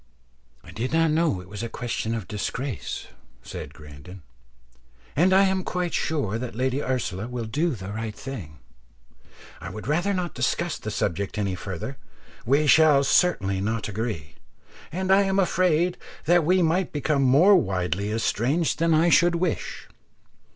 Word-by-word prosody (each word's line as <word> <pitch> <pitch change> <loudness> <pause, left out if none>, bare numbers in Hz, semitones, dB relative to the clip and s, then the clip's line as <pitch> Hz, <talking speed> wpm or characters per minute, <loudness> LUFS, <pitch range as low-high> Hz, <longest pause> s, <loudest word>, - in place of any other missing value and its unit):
"I - - -12
did 125 +6 -4
not 165 -1 +3
know 155 - +1
it 90 - -14
was 105 +2 -7
a 115 - -4
question 115 -1 -3
of 110 -5 -5
disgrace," 115 +4 -4 0.4
said - - -7
Grandon, 75 +5 -12 0.9
"and 175 +6 +4
I 190 +1 +6
am 190 -1 +1
quite 180 -2 -2
sure 125 -9 -1
that 120 -2 -6
Lady 130 +3 0
Ursula 115 -7 -2
will 120 -2 -4
do 150 +7 0
the 95 -1 -7
right 110 0 -4
thing. 105 - -8 1.0
I - - -7
would 105 +3 -8
rather 175 +7 +1
not 180 -3 -2
discuss 130 +7 -1
the 110 - -5
subject 100 -1 -2
any 100 -3 -1
further; 95 +8 -6 0.5
we 140 +4 +3
shall 150 -2 +6
certainly 100 - +2
not 110 +2 -2
agree, 105 -7 -4 0.6
and 185 +3 -1
I 195 +1 +6
am 195 -1 +1
afraid 180 -2 +2 0.3
that 175 +2 +4
we 180 +2 +3
might 170 +2 +1
become 145 -1 0
more 145 +10 +6
widely 95 - 0
estranged 120 - 0
than 165 -1 +3
I 165 +2 +4
should 175 +1 +4
wish. 170 0 -3
130 Hz, 160 wpm, -25 LUFS, 105-170 Hz, 1.0 s, I